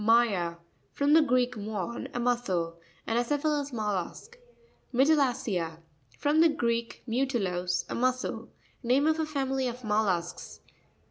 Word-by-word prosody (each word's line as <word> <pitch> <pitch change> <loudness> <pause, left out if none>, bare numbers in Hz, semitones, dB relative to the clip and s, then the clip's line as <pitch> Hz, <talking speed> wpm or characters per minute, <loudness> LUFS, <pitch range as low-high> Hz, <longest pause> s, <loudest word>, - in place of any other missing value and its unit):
My'a.—From 210 - +1
the 320 - +8
Greek, 250 -3 +2
muén, 215 +1 -4
a - - 0
muscle. 190 -9 0 0.3
An 225 - 0
acephalous 290 +3 0
mollusk. 215 - -3 0.6
Mytiia'cea.—From 220 - +1
the 330 - +6
Greek, 235 -5 -1
mu 255 +3 0
tilos, 180 -8 -1
a - - -5
mussel. 255 +1 -1 0.3
Name 260 +3 +3
of 315 0 +2
a 315 - 0
family 270 -3 -1
of 245 +1 -6
mollusks. 200 -5 -1
240 Hz, 120 wpm, -29 LUFS, 190-270 Hz, 0.6 s, the